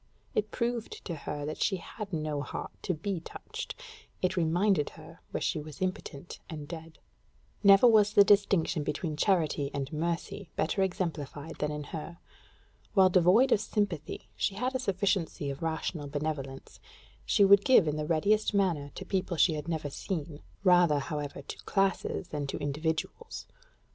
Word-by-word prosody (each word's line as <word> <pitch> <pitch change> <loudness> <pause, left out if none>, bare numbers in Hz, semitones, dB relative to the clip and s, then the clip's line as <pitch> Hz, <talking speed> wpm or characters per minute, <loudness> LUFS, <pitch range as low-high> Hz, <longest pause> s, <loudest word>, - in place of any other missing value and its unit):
It 215 0 0
proved 235 -1 -3
to 175 - -3
her 145 -1 -5
that 155 - -5
she 195 - +2
had 200 +3 -8
no 155 -3 -2
heart - - -5
to 180 - -1
be 185 +3 -3
touched: 165 - -7 0.5
it 185 0 +1
reminded 175 0 +2
her - - -13
where - - -3
she - - 0
was 150 -1 -9
impotent 180 -4 -4
and 150 -3 -6
dead. 160 0 -9 0.7
Never 200 +3 +8
was 215 -3 +6
the 200 - +8
distinction 200 -6 +3
between 150 +2 -2
charity 155 -5 +1
and 140 +1 -3
mercy 170 +4 -3
better 170 +5 0
exemplified 160 -5 -3
than 150 - 0
in 150 0 -4
her. 165 +1 -6 0.8
While 190 -2 +6
devoid 185 +9 +5
of 205 - +4
sympathy, 205 -8 -3
she 195 - -1
had 250 +5 -1
a 260 - 0
sufficiency 190 - 0
of 135 - -8
rational 160 -1 -2
benevolence: 140 -2 -4 0.4
she 200 - +4
would 200 0 +7
give 250 -10 +6
in 150 - 0
the 150 0 -3
readiest 205 +7 +2
manner 170 -8 +1
to 190 - -7
people 185 -2 -1
she 160 - +5
had 150 0 -5
never 155 -4 -2
seen 160 -2 -4 0.2
rather, 175 -5 +5
however, 145 -1 -4
to - - -7
classes 195 -2 0
than 145 -3 -3
to - - -3
individuals. 160 - -3
170 Hz, 165 wpm, -30 LUFS, 150-195 Hz, 0.8 s, Never